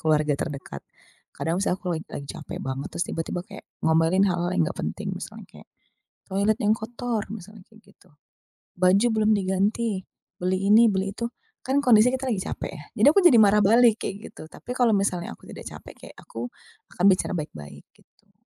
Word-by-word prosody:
keluarga 155 -1 +2
terdekat, 140 -4 -5 0.6
kadang 170 +3 -1
misal 190 -2 +1
aku 185 -2 -4
lag 160 - -2
lagi 140 - -7
capek - - -8
banget 135 +1 -4
terus 175 - 0
tiba-tiba 170 +2 -3
kayak 200 0 -12 0.2
ngomelin 165 +4 +3
hal-hal 175 -2 0
yang - - +3
gak - - -4
penting - - -4
misalnya - - -8
kayak, - - -15 0.6
toilet 200 +3 +2
yang 210 - +2
kotor 235 +2 -2 0.2
misalnya 210 -1 -12
kayak 220 -1 -21
gitu, - - -25 0.7
baju 190 +5 +4
belum 220 -1 +2
diganti, 195 +1 -1 0.3
beli 185 +1 -1
ini 230 +2 +7
beli 195 -2 0
itu 235 +4 -4 0.3
kan 275 +2 0
kondisi 230 -3 +6
kita 260 0 -1
lagi 210 - -1
capek 190 - -5
ya 150 -5 -10 0.2
jadi - - +8
aku 360 - +4
jadi 350 -9 +6
marah 210 -2 +6
balik 225 +2 +5
kayak 200 +2 -6
gitu 155 - -11
tapi 205 - -10
kalau 245 -3 +3
misalnya 180 - -1
aku - - -31
tidak - - -10
capek - - -10
kayak - - -14
aku, 115 +1 -6 0.5
akan 180 - +1
bicara 185 - 0
baik-baik 75 - -7
gitu. - - -31
195 Hz, 185 wpm, -25 LUFS, 175-220 Hz, 0.7 s, jadi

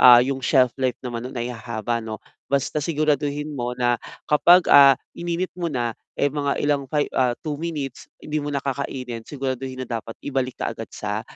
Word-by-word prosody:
ah, 120 -1 +10
yung 135 0 -2
shelf 130 -3 +4
life 130 -2 +1
naman 120 0 -4
nun 130 - -10
ay 120 +1 -2
hahaba 115 0 -3
'no 110 -1 -5 0.4
basta 140 +2 +1
siguraduhin 150 -2 0
mo 120 0 -2
na 120 -1 +2 0.3
kapag, 175 +4 +6
ah, 140 -1 +10 0.2
ininit 175 +1 -2
mo 175 -1 -1
na, 120 -3 -1 0.2
eh, 145 - +4
mga 140 0 -1
ilang 145 -1 +1
fi 150 +2 +1
ah, 125 -2 +3
2 150 -2 -3
minutes 150 -6 -4
hindi 155 0 -2
mo - - -3
na 140 - 0
kakainin 130 -4 -4
siguraduhin 130 -2 -4
na - - -17
dapat 115 -1 -4
ibalik 130 -2 -1
kaagad - - -3
sa - - -3
135 Hz, 185 wpm, -23 LUFS, 125-145 Hz, 0.4 s, ah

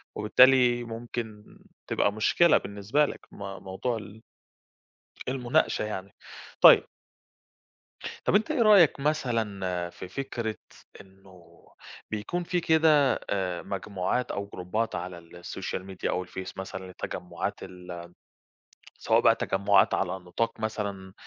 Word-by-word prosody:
وبالتالي 120 +2 +5
ممكن 115 -2 -7 0.3
تبقى 100 - +1
مشكلة 155 +10 +4
بالنسبة 100 +9 0
لك، - - -6
م - - -14 0.3
موضوع 105 +5 -3
ال 105 +1 -11 1.1
المناقشة 130 0 +1
يعني. 100 -2 -6 0.5
طيب - - +9 1.4
طَب - - +1
أنت 215 +9 +3
إيه 290 -6 +2
رأيك 195 -10 +6
مثلًا 105 - -1
في 90 - -9
فكرة 115 -2 -4 0.4
إنه 95 -3 -18 0.5
بيكون 110 +12 -3
في 180 0 0
كده 155 -4 +4
آآ 90 -3 -2
مجموعات 100 +4 -2
أو 100 0 -3
جروبّات 105 +5 -2
على 90 0 -5
السوشيال 90 +2 -7
ميديا 95 -1 -4
أو 90 - -1
الفيس 95 +1 -8
مثلًا 95 0 -6
للتجمُّعات 90 -1 -5
ال 90 -1 -9 0.9
سواء - - +3
بقى - - +5
تجمُّعات 100 +1 +2
على - - 0
نطاق 95 +5 -3
مثلًا 100 -3 -4
105 Hz, 115 wpm, -27 LUFS, 95-125 Hz, 1.4 s, طيب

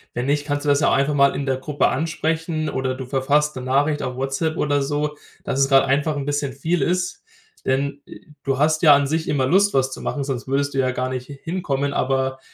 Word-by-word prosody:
Wenn 120 - -2
nicht, 145 +1 0
kannst 145 0 -2
du - - +1
das 140 0 +4
ja - - +2
auch - - +2
einfach 140 +2 +2
mal 140 -1 +4
in 140 - -2
der 135 -1 0
Gruppe 145 +2 0
ansprechen 160 +1 -2
oder 130 0 -2
du 130 0 -6
verfasst 145 +3 +1
'ne 130 - -5
Nachricht 145 +4 +1
auf 125 -1 -4
WhatsApp 135 +5 -2
oder 145 -1 +1
so, 150 +1 -2 0.3
dass 135 - -2
es 135 0 +3
gerade 135 -1 +5
einfach 145 +3 +1
'n 140 - -3
bisschen 145 -2 -2
viel 160 +3 -1
ist, 180 +4 -1 0.4
denn, 140 +2 -1
äh, - - -11 0.2
du 135 -1 0
hast 155 +2 +2
ja 150 -4 +8
an 140 0 +2
sich 160 +2 -1
immer 135 -3 +1
Lust, 195 +8 +3
was 130 0 +2
zu - - -7
machen, 145 - -2
sonst 135 -3 -4
würdest 140 +1 0
du 135 - -1
ja 130 -1 +2
gar 130 0 -2
nicht 130 0 -5
h 140 - -7
hin 180 +3 -3
kommen. 140 -1 -1
Aber 130 0 0
140 Hz, 250 wpm, -22 LUFS, 135-150 Hz, 0.4 s, ja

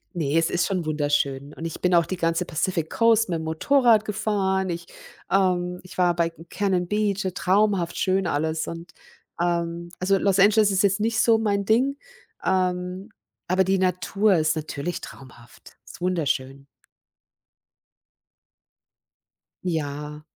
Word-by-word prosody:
Ne, 155 -2 0
es 165 0 +2
ist 175 0 +1
schon 185 -3 -2
wunderschön 145 -2 -1
und 165 - -8
ich 165 - -6
bin 180 0 +2
auch 170 -1 +5
die 185 - -4
ganze 165 +1 0
Pacific 165 0 -2
Coast 225 -2 +3
mit 170 -2 -1
'm - - -5
Motorrad 220 - +3
gefahren. 190 -2 -1
Ich 170 0 -4 0.4
ähm, 180 -2 +1
ich 185 - -13
war 175 -1 +3
bei 170 -1 0 0.2
Cannon 185 -3 0
Beach, 210 0 0
äh, 185 - -1
traumhaft 190 -1 +1
schön 190 0 +1
alles 160 +1 -1
und 170 +1 -8 0.5
ähm, 170 0 -1
also, 195 +2 +2
Los 195 0 +1
Angeles 210 +1 +5
ist 190 0 +2
jetzt 200 0 +2
nicht 225 +1 0
so 230 -2 +4
mein 205 -2 0
Ding, 255 +7 +2 0.5
ähm, 185 +1 -1 0.4
aber 185 +1 +3
die 190 +1 +1
Natur 190 +2 +1
ist 155 0 +1
natürlich 155 +2 -4
traumhaft, 125 -3 -14
ist - - -13
wunderschön. 140 -6 -2 3.0
Ja. 150 -3 -4
180 Hz, 145 wpm, -24 LUFS, 165-195 Hz, 3.0 s, auch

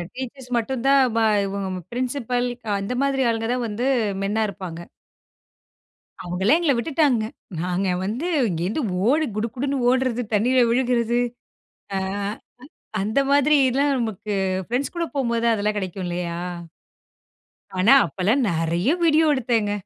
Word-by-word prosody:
Teachers 260 0 -7
மட்டும் 235 +1 -2
தான் 275 0 +6 0.2
பா 225 - +3 0.2
இவுங்க 195 0 -3 0.2
பிரின்சிபல் 250 0 -1 0.2
அ - - -2
அந்த 200 +5 -3
மாதிரி 270 -1 +1
ஆளுங்க 225 0 -1
தான் 250 -1 -1
வந்து 225 +4 -2 0.4
மென்னா 210 +3 0
இருப்பாங்க. 185 -4 -7 1.4
அவுங்களே 185 - +2
எங்கள 325 -5 +2
விட்டுட்டாங்க. 270 -3 +1 0.4
நாங்க 180 +2 -1 0.2
வந்து 230 - -2 0.2
இங்கே 170 -2 -2
இருந்து 225 +11 -1 0.2
ஓடி 310 +5 +3
குடுகுடுன்னு 250 +6 -2
ஓட்றது, 255 -1 +1
தண்ணீல 250 +5 +3
விழுகுறது, 240 -1 +1 0.8
அ - - +1 1.0
அந்த 215 +6 +1
மாதிரி 285 +1 +4
எல்லாம் 280 +3 +2
நமக்கு 220 -4 -3 0.3
பிரெண்ட்ஸ்கூட 280 +8 -2
போம்போதுதான் 235 -3 +1
அதெல்லாம் 210 0 -1
கிடைக்கும் 190 -1 -4
இல்லயா! 175 -1 -3 1.4
ஆனா, 195 +7 +5
அப்பல்லாம் 215 +8 +1
நெறைய 170 - 0
வீடியோ 320 0 +4
எடுத்தேங்க. 230 -5 0
235 Hz, 125 wpm, -23 LUFS, 200-265 Hz, 1.4 s, தான்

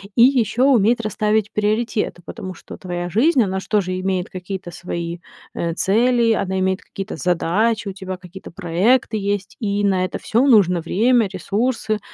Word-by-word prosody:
и 235 - +6
ещё 255 -1 +3
уметь 230 0 +3
расставить 215 -1 0
приоритеты. 210 -3 -1
Потому 185 0 -7
что - - -11
твоя 175 -1 -4
жизнь, 250 - +3
она 190 -1 -2
ж - - -11
тоже 185 -3 0
имеет 185 -1 -2
какие-то 185 -1 -6
свои, 170 0 -5 0.3
э, 170 -1 -2
цели, 230 +5 +2
она 190 -3 0
имеет 190 0 0
какие-то 195 0 -7
задачи, 200 +5 0
у 195 - -4
тебя 190 -1 -6
какие-то 180 +1 -11
проекты 200 +9 +1
есть, 200 -1 -3
и 205 -2 -1
на 190 -2 +2
это 185 - -4
всё 235 +5 +1
нужно 180 -8 +4
время, 225 +7 +2
ресурсы, 215 +3 -1
200 Hz, 165 wpm, -20 LUFS, 185-225 Hz, 0.3 s, и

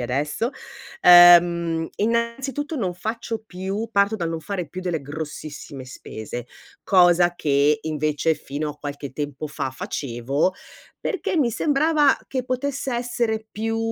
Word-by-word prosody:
adesso, 145 - -1 0.5
ehm, 170 -2 +7
innanzitutto 235 +7 -1
non 190 - -2
faccio 220 +3 -4
più 195 +5 -4
parto 200 +1 +3
dal 170 -5 -2
non 165 -1 -3
fare 180 +1 -4
più 185 - -7
delle 175 -4 -2
grossissime 145 -1 -7
spese, 120 -1 -8 0.3
cosa 175 -2 +4
che 145 0 +2
invece 155 0 0
fino 150 +1 -4
a 150 - -11
qualche 145 -1 -6
tempo 145 +1 -4
fa 145 -3 -4
facevo 135 +5 -2 0.5
perché 390 -4 -1
mi 270 -7 +3
sembrava 295 +3 +3
che 255 -2 -3
potesse 260 0 -2
essere 235 -2 -1
più, 225 +1 -2
175 Hz, 130 wpm, -23 LUFS, 150-230 Hz, 0.5 s, ehm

